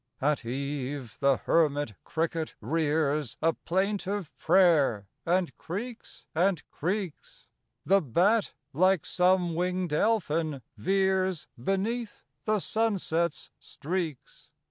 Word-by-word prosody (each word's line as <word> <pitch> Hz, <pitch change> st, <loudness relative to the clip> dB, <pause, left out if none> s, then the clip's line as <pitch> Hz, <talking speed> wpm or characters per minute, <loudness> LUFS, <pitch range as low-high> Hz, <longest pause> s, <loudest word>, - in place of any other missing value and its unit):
At 145 Hz, 0 st, +1 dB
eve 135 Hz, 0 st, -4 dB
the 140 Hz, -2 st, +4 dB
hermit 145 Hz, -7 st, +1 dB
cricket 165 Hz, 0 st, -2 dB
rears 150 Hz, 0 st, 0 dB
A 165 Hz, +1 st, +2 dB
plaintive 195 Hz, 0 st, -2 dB
prayer, 160 Hz, -, +4 dB, 0.2 s
and 180 Hz, 0 st, +1 dB
creaks 225 Hz, +7 st, -7 dB
and 175 Hz, +1 st, +1 dB
creaks; 185 Hz, 0 st, -4 dB, 0.4 s
The 195 Hz, +1 st, +5 dB
bat, 185 Hz, -, +2 dB, 0.2 s
like 185 Hz, +2 st, +3 dB
some 180 Hz, -1 st, +2 dB
wing'd 180 Hz, -1 st, -1 dB
elfin, 160 Hz, -, +1 dB
veers 190 Hz, -, +1 dB
Beneath 205 Hz, -, -2 dB, 0.2 s
the 215 Hz, 0 st, +2 dB
sunset's 185 Hz, -7 st, 0 dB
streaks. 160 Hz, -2 st, -5 dB
170 Hz, 100 wpm, -28 LUFS, 145-190 Hz, 0.4 s, The